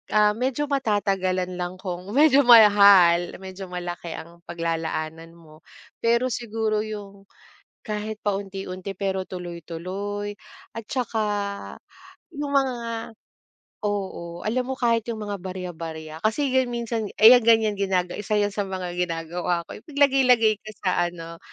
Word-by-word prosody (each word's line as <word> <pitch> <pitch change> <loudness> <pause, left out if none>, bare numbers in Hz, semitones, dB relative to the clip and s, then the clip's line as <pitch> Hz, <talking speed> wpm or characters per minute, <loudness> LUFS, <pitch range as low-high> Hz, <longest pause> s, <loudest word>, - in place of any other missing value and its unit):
ah, 210 0 +5
medyo 255 +6 -1
matatagalan 195 -9 0
lang 180 +1 -3
kung 185 -1 -6
medyo 285 -1 +6
mahal, 200 -6 +7
medyo 190 0 -8
malaki 175 -2 -6
ang 170 +1 -11
paglalaanan 165 -1 -4
mo, 155 -2 -17 0.4
pero 235 +2 +2
siguro 220 -2 -1
'yong 200 -2 -7 0.6
kahit 215 0 -4
paunti-unti 195 -2 -4
pero 190 -1 -1
tuloy-tuloy 185 +4 -6 0.4
at 230 - -5
'tsaka 235 0 -2 1.1
'yong 290 -2 -4
mga 270 -2 +2 1.0
oo, 190 -4 -4
alam 250 +4 -1
mo 265 - -2
kahit 230 -3 +1
'yong 220 -2 -4
mga 205 -1 -4
barya-barya 165 -4 -7
kasi 255 - 0
'yan 260 -1 +2
minsan 235 -2 -3
eh, 220 +2 +9
'yan 250 - +8
ganyan 220 -2 +5
ginaga 185 -2 0
isa 210 +1 -1
'yan 205 -1 +1
sa 205 -1 -3
mga 185 -2 -4
ginagawa 175 0 -2
ko, - - -10
ipaglagay-lagay 255 -6 +3
ko 215 - -11
sa 180 -2 +2
ano, 165 -1 -9
200 Hz, 130 wpm, -24 LUFS, 175-225 Hz, 1.1 s, eh